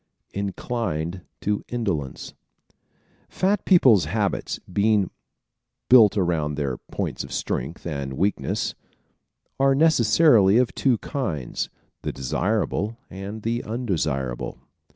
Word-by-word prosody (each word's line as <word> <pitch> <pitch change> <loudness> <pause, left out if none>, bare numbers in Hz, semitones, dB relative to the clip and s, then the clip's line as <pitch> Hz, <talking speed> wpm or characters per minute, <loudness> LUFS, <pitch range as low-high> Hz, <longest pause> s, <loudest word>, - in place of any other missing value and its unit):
Inclined 95 -4 -3 0.2
to 105 0 -1
Indolence 95 - -3 0.4
¶ - - -35 0.6
Fat 195 +2 0
people's 130 - +6
habits, - - -1
being 100 +1 +1 0.8
built 110 -5 +7
around 80 -6 0
their 70 -4 -2
points - - -4
of 70 - -10
strength 65 +4 -3
and 70 -5 -3
weakness, 100 +9 -1 0.9
are 135 0 +4
necessarily 120 -7 +5
of 125 -1 +2
two 130 -4 +2
kinds 90 - -3 0.3
the - - -3
desirable 105 - -1
and 100 +3 -7
the 115 +1 -1
undesirable. 80 - -2
100 Hz, 105 wpm, -24 LUFS, 75-120 Hz, 0.9 s, built